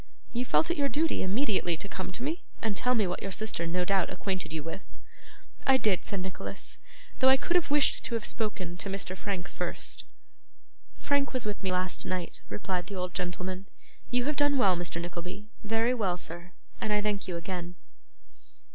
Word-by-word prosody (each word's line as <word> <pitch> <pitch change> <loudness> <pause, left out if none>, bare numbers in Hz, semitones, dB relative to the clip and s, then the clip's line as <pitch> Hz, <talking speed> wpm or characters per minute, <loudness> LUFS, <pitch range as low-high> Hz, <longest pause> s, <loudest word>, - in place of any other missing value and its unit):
'You 245 +1 0
felt 325 +6 +3
it 345 - 0
your 280 -1 +3
duty 315 +3 +2
immediately 190 - +2
to 200 - -5
come 190 -2 -4
to 240 - -2
me, 320 +6 -1 0.2
and 220 -3 0
tell 250 +5 +3
me 215 -3 +4
what 180 -1 -2
your 195 - -2
sister 215 -5 0
no 180 +2 +1
doubt 195 -1 +3
acquainted 185 -5 -2
you 160 -2 -2
with?' 165 +4 -7 0.7
'I 265 -1 +8
did,' 210 -7 +2
said 200 -2 -2
Nicholas, 185 0 -5 0.4
'though 260 - +7
I 265 - +8
could 345 - -1
have 345 -4 +4
wished 290 0 +4
to 240 - -1
have 225 - -1
spoken 185 -6 -1
to 195 - -3
Mr 190 -1 -2
Frank 190 -2 -3
first.' - - -4 0.9
'Frank 285 -1 +1
was 255 -4 0
with 210 -1 -2
me 190 -2 0
last 180 0 +1
night,' 185 -2 -3
replied 185 -4 -2
the 200 - -5
old 180 -1 -2
gentleman. 185 +1 -3 0.4
'You 245 0 +2
have 295 0 0
done 290 -1 +4
well, 195 -8 +5
Mr. 175 -1 -2
Nickleby 175 +3 -5 0.2
very 225 +3 +3
well, 195 -7 +1
sir 175 +1 -5 0.3
and 215 - 0
I 210 - +4
thank 205 -1 0
you 175 -2 -2
again. 175 0 -4
195 Hz, 195 wpm, -30 LUFS, 180-245 Hz, 0.9 s, I